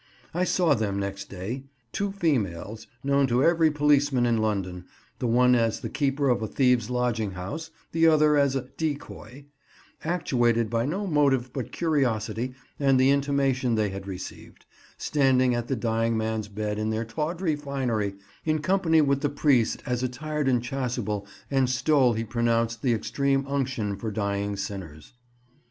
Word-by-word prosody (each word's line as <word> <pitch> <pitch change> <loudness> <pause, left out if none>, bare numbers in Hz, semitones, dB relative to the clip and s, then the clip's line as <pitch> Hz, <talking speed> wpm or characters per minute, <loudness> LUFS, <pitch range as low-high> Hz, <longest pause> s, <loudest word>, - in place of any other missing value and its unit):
I 180 +2 +1
saw 180 -2 +3
them 105 -3 -1
next 100 0 -4
day 105 +8 -5 0.3
(two 200 0 -2
females, 115 - -2 0.2
known 140 0 +3
to 125 +2 +2
every 165 -1 +4
policeman 145 -3 +3
in 120 -1 +2
London, 95 -4 -2 0.3
the 125 - -1
one 125 +2 +4
as 115 -2 +1
the - - -5
keeper 140 0 0
of 120 -2 +2
a 110 - -2
thieves' 125 -2 +2
lodging 120 -5 -1
house, 95 - -6 0.2
the 165 0 +4
other 155 -1 +5
as 140 -2 +3
a 135 - 0 0.2
"decoy"), 140 -4 -5 0.6
actuated 120 -9 +1
by 115 +2 0
no 190 +7 -2
motive 140 -7 +2
but 130 -4 -4
curiosity 125 -6 -1 0.2
and 135 -2 +3
the 130 +1 +5
intimation 135 -3 +1
they 105 -2 +1
had 95 0 -7
received, 95 -1 -9 0.3
standing 130 -3 +2
at 120 0 -2
the 135 - 0
dying 115 0 0
man's 110 -1 -2
bed 105 0 -3
in 110 0 -1
their 110 +1 -1
tawdry 155 +8 -2
finery, 125 -9 -2 0.3
in 155 -1 +1
company 165 0 +3
with 140 -2 +2
the 145 - +1
priest 140 -5 +2
as 125 -2 -1
attired 145 +3 -2
in 125 -3 +3
chasuble 120 -5 -3 0.2
and 135 -2 +2
stole 130 -1 +3
he 115 +1 -2
pronounced 115 0 0
the 125 -3 +2
extreme 135 +4 0
unction 130 -7 -2
for 110 +3 -4
dying 100 -1 -2
sinners. 95 - -7
125 Hz, 160 wpm, -26 LUFS, 110-140 Hz, 0.6 s, other